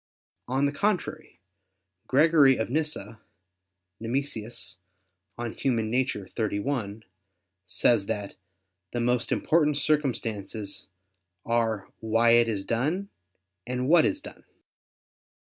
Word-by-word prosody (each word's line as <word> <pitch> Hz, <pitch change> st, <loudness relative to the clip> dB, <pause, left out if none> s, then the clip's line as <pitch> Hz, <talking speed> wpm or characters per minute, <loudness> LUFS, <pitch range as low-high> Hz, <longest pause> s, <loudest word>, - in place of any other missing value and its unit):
On 135 Hz, +3 st, +1 dB
the 140 Hz, -, +1 dB
contrary, 200 Hz, +5 st, -2 dB, 0.7 s
Gregory 145 Hz, -2 st, +5 dB
of 110 Hz, -, -2 dB
Nyssa 130 Hz, -8 st, -2 dB, 0.8 s
[*Nemesius, 115 Hz, -3 st, -3 dB, 0.6 s
De 120 Hz, -, -4 dB
Nat. -, -, -11 dB
Hom. 130 Hz, -4 st, +2 dB
xxxi.] 110 Hz, -1 st, -2 dB, 0.6 s
says 100 Hz, +3 st, +2 dB
that 100 Hz, -1 st, -3 dB, 0.6 s
"the 120 Hz, -, -1 dB
most 120 Hz, 0 st, +1 dB
important 150 Hz, -3 st, +2 dB
circumstances" 115 Hz, -9 st, -2 dB, 0.6 s
are 115 Hz, -4 st, 0 dB
"why 115 Hz, +1 st, +3 dB
it 120 Hz, 0 st, +6 dB
is 100 Hz, -4 st, -2 dB
done" 155 Hz, +12 st, -1 dB, 0.6 s
and 125 Hz, +1 st, -2 dB
"what 165 Hz, +1 st, +6 dB
is 295 Hz, -, 0 dB
done." -, -, -11 dB
120 Hz, 100 wpm, -27 LUFS, 110-145 Hz, 0.8 s, it